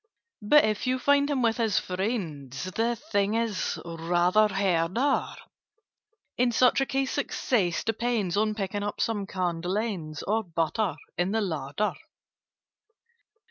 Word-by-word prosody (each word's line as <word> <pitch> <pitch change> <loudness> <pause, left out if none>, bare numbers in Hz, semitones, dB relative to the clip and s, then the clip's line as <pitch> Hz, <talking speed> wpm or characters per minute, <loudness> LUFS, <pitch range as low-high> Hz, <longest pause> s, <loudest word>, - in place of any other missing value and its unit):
"But 290 +8 +6
if 215 +3 -1
you 255 0 +2
find 285 +2 +3
him 270 -4 0
with 225 0 +2
his 225 -4 +1
friends, 180 - -3
The 230 +4 0
thing 210 -6 -1
is 230 -4 -1
rather 175 +5 +2
harder. 195 +6 +1 1.0
In 250 -1 +3
such 250 +3 +4
a 270 - +1
case 270 -1 -1
success 210 - 0
depends 225 -4 -1
On 215 +1 +1
picking 205 0 -3
up 205 0 -4
some 205 -4 -1
candle 180 0 -2
ends, 175 -9 -3
Or 220 +2 0
butter, 165 +1 -1 0.2
in 180 +3 +1
the 225 - +1
larder. 160 +1 -2
205 Hz, 135 wpm, -27 LUFS, 175-230 Hz, 1.0 s, But